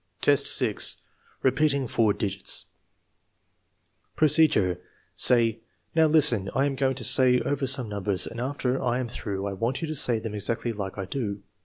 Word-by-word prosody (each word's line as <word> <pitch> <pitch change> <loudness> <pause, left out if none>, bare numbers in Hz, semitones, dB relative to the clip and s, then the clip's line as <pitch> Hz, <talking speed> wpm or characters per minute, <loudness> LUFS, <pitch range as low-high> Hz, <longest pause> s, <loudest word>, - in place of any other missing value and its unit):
IV, 145 -1 +5
6. - - -1 0.5
Repeating 140 +1 +1
four 110 -2 +1
digits 100 -2 -2 1.5
Procedure. 145 - +2 0.4
Say: 115 -2 +3 0.3
"Now, 160 -1 +4
listen. 140 -11 +3
I 135 - +2
am 140 - -1
going 135 -1 0
to - - -7
say 125 -1 +5
over 140 -1 -2
some 130 -2 +1
numbers 100 -2 -2
and 115 - -7
after 130 -1 -2
I 125 -1 0
am 125 - -3
through, 100 -4 -5
I 100 - -3
want 115 - -3
you - - -2
to 155 - -4
say 125 -5 +2
them 110 -1 -6
exactly 115 +3 -3
like 100 -3 -6
I 100 - -4
do. 100 -2 -4
120 Hz, 165 wpm, -25 LUFS, 105-135 Hz, 1.5 s, IV